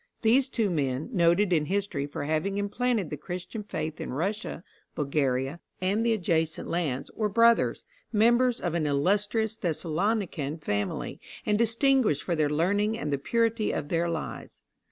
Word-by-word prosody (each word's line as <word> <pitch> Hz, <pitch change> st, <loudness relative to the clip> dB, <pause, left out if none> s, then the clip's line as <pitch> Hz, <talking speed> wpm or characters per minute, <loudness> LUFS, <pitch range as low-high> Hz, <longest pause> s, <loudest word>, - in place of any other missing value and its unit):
These 255 Hz, +4 st, +4 dB
two 220 Hz, -7 st, 0 dB
men, 140 Hz, -, -1 dB
noted 175 Hz, +1 st, +3 dB
in 155 Hz, -3 st, +2 dB
history 185 Hz, -6 st, -1 dB
for 145 Hz, -, -5 dB
having 160 Hz, +7 st, -1 dB
implanted 205 Hz, -1 st, 0 dB
the 150 Hz, -, -3 dB
Christian 180 Hz, +7 st, -6 dB
faith 160 Hz, -6 st, -4 dB
in -, -, -4 dB
Russia, 190 Hz, +4 st, -3 dB, 0.3 s
Bulgaria, 140 Hz, 0 st, 0 dB, 0.2 s
and 195 Hz, +4 st, +1 dB
the 235 Hz, -, +2 dB
adjacent 165 Hz, -5 st, 0 dB
lands, 150 Hz, -7 st, -2 dB
were 215 Hz, -2 st, 0 dB
brothers, 230 Hz, +2 st, +3 dB, 0.3 s
members 235 Hz, +3 st, +3 dB
of 175 Hz, -3 st, -2 dB
an 160 Hz, -3 st, 0 dB
illustrious 205 Hz, +9 st, +1 dB
Thessalonican 170 Hz, -3 st, -1 dB
family, 105 Hz, -, -3 dB, 0.3 s
and 210 Hz, -, +2 dB
distinguished 230 Hz, -, +3 dB
for 175 Hz, -, -1 dB
their 155 Hz, -2 st, +2 dB
learning 200 Hz, +8 st, +1 dB
and 150 Hz, -8 st, -2 dB
the 140 Hz, -, 0 dB
purity 230 Hz, -, +1 dB
of 145 Hz, -, -3 dB
their 170 Hz, 0 st, +1 dB
lives. 165 Hz, -2 st, -6 dB
180 Hz, 155 wpm, -28 LUFS, 155-220 Hz, 0.3 s, These